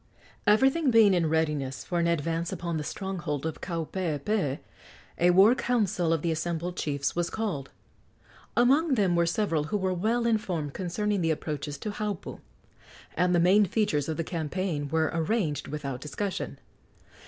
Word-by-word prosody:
Everything 265 +8 +4
being 225 -4 +6
in 170 -3 +2
readiness 150 -5 -1
for 175 - -1
an 170 - +2
advance 165 +1 -1
upon 170 -2 -3
the 150 - -3
stronghold 170 -5 -4
of 160 - -4
Kaupeepee, 165 -2 -2 0.6
a 175 - +5
war 195 +6 +7
council 210 -9 0
of 165 -2 0
the 170 - +1
assembled 170 +2 -2
chiefs 140 -4 -2
was 170 -1 0
called. 185 -12 -3 0.9
Among 270 +5 +4
them 195 -6 +2
were 170 0 +3
several 165 -5 0
who 210 - -1
were 190 -1 0
well 225 +6 0
informed 180 -10 -1
concerning 200 +2 -1
the 165 - +1
approaches 150 -2 -3
to 210 +8 -4
Haupu, 210 -3 -4 0.8
and 180 +1 +2
the - - +4
main 190 +5 +5
features 175 -8 0
of 160 - -2
the 165 - -1
campaign 160 -2 -3
were 160 +1 +1
arranged 160 - -1
without 140 -4 -5
discussion. 190 +6 -4
170 Hz, 155 wpm, -28 LUFS, 155-205 Hz, 0.9 s, war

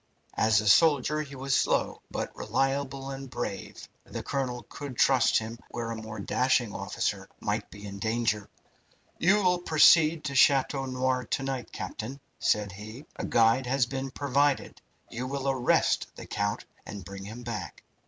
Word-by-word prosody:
As 110 -1 +3
a 105 - -3
soldier 150 +4 +4
he 140 -2 -8
was 135 +1 -2
slow, - - +1
but - - -4
reliable 135 +3 -1
and 135 0 -7
brave. 120 -6 -5 0.2
The - - -7
colonel 130 -3 -2
could 140 -4 -8
trust 125 +1 +4
him 115 +1 -4
where 115 -1 -4
a - - -3
more 110 -1 -7
dashing 125 +1 +1
officer - - -3
might - - -2
be 100 +2 -11
in 100 -1 -7
danger. 110 -1 0 0.7
"You 205 +5 +4
will 180 -1 +3
proceed 160 -1 +5
to 140 - -3
Chateau 135 0 +4
Noir 130 0 0
to 135 - -2
night, 135 -2 -4
captain," 130 +6 -6 0.2
said 105 -2 +1
he. 110 +8 -10
"A - - -3
guide 115 +2 +3
has 130 0 +2
been 135 +2 -4
provided. 140 +1 0 0.3
You 125 +2 -4
will 140 0 -3
arrest 130 -2 +2
the - - -9
count 100 0 -2 0.2
and 100 -3 -8
bring 100 +1 -8
him 115 +4 -8
back. 105 - -6
130 Hz, 165 wpm, -28 LUFS, 110-135 Hz, 0.7 s, proceed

